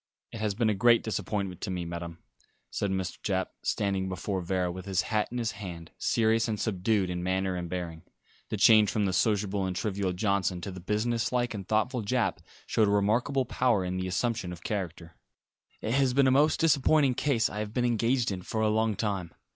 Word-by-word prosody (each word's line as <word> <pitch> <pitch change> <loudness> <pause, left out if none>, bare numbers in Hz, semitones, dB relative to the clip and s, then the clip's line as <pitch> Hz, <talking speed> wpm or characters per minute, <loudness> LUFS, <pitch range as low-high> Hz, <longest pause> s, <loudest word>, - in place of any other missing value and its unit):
"It 115 - -7
has 105 -2 -1
been 110 0 +2
a - - +1
great 115 +4 +4
disappointment 100 -3 -3
to - - -3
me, 90 -2 -3
Madam," 85 0 -6 0.5
said 100 - -1
Mr. 95 -2 -3
Japp, 95 -2 -1
standing 95 -2 -1
before 95 +1 -3
Vera, 90 0 -1
with 95 +1 -8
his 95 -1 +1
hat 105 -1 0
in 125 - -4
his 115 -2 -1
hand, 90 -5 -8
serious 115 0 +2
and 110 -2 -2
subdued 95 -2 0
in 90 0 -3
manner 95 +1 0
and 90 -1 -4
bearing. 85 -3 -5 0.5
The - - -2
change 110 -2 +6
from 105 -2 0
the 95 - 0
sociable 100 0 +1
and 90 - -3
trivial 100 -1 -1
Johnson 95 -2 0
to 95 - -5
the 90 - -8
business 115 +5 -1
like 120 -2 0
and 100 -3 -6
thoughtful 115 +3 +1
Japp 120 +3 0 0.3
showed 110 - +2
a - - +2
remarkable 115 +7 +2
power 120 -6 +1
in 90 +1 -2
the 95 0 -2
assumption 95 +1 -1
of 90 -2 -9
character. 90 -5 -4 0.6
"It 110 - -1
has 130 -2 +2
been 140 -1 +5
the 130 - +4
most 150 +4 +3
disappointing 150 -3 +4
case 120 -3 +1
I 105 - -6
have 105 -1 -3
been 125 +2 0
engaged 120 0 +1
in 95 -2 -4
for 110 +4 -3
a 110 - +3
long 110 0 +1
time. 95 -6 -3
105 Hz, 210 wpm, -28 LUFS, 95-115 Hz, 0.6 s, change